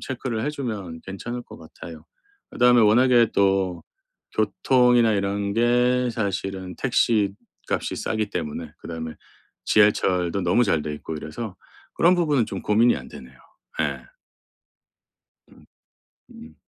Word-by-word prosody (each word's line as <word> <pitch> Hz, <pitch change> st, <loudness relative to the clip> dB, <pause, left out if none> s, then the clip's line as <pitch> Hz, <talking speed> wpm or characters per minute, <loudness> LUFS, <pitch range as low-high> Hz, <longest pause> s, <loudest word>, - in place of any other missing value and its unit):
체크를 125 Hz, -4 st, -4 dB
해 150 Hz, -, -1 dB
주면 105 Hz, -, -5 dB
괜찮을 120 Hz, +6 st, -6 dB
것 -, -, -13 dB
같아요. 80 Hz, 0 st, -12 dB, 0.5 s
그다음에 125 Hz, -1 st, +4 dB
워낙에 120 Hz, +1 st, +5 dB
또 95 Hz, -3 st, +1 dB, 0.5 s
교통이나 120 Hz, +2 st, +3 dB
이런 100 Hz, 0 st, -1 dB
게 125 Hz, +2 st, +2 dB
사실은 95 Hz, -4 st, -4 dB
택시값이 110 Hz, -6 st, -1 dB
싸기 110 Hz, -2 st, -2 dB
때문에 80 Hz, -3 st, -5 dB
그다음에 80 Hz, -1 st, -7 dB, 0.5 s
지하철도 95 Hz, -3 st, +2 dB
너무 90 Hz, +8 st, +3 dB
잘 80 Hz, -8 st, +1 dB
돼 75 Hz, -, -4 dB
있고 75 Hz, +2 st, -7 dB
이래서 80 Hz, +7 st, -7 dB, 0.4 s
그런 175 Hz, +2 st, +4 dB
부분은 150 Hz, -9 st, +1 dB
좀 -, -, -6 dB
고민이 115 Hz, +3 st, +3 dB
안 -, -, -9 dB
되네요. 65 Hz, 0 st, -13 dB, 0.4 s
예. 70 Hz, -4 st, -3 dB, 1.4 s
음. -, -, -20 dB, 0.6 s
음. 80 Hz, 0 st, -13 dB
105 Hz, 260 characters per minute, -23 LUFS, 90-120 Hz, 1.4 s, 워낙에